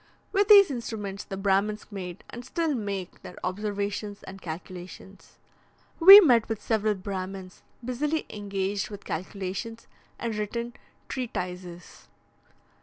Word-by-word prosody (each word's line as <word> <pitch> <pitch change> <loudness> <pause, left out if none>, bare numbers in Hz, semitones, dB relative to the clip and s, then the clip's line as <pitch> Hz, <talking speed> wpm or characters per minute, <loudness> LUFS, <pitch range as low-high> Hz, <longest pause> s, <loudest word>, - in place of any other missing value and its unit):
With 400 0 +2
these 400 -6 +8
instruments, 210 -5 -5
the 195 - -6
Brahmins 200 +2 0
made, 180 -3 -7
and 240 - -8
still 325 +3 -1
make, 200 -6 -5
their 180 - -11
observations 205 +1 -3
and 190 0 -10
calculations. 180 +3 -9 0.6
We 390 +4 +12
met 245 - +4
with 225 -2 -2
several 215 -2 0
Brahmins 190 -1 -6 0.2
busily 295 +6 -1
engaged 200 -1 -3
with 205 -1 -10
calculations 195 +6 -5 0.3
and 230 -2 -3
written 235 +3 -3 0.3
treatises. 180 -7 -6
205 Hz, 115 wpm, -27 LUFS, 190-235 Hz, 0.6 s, We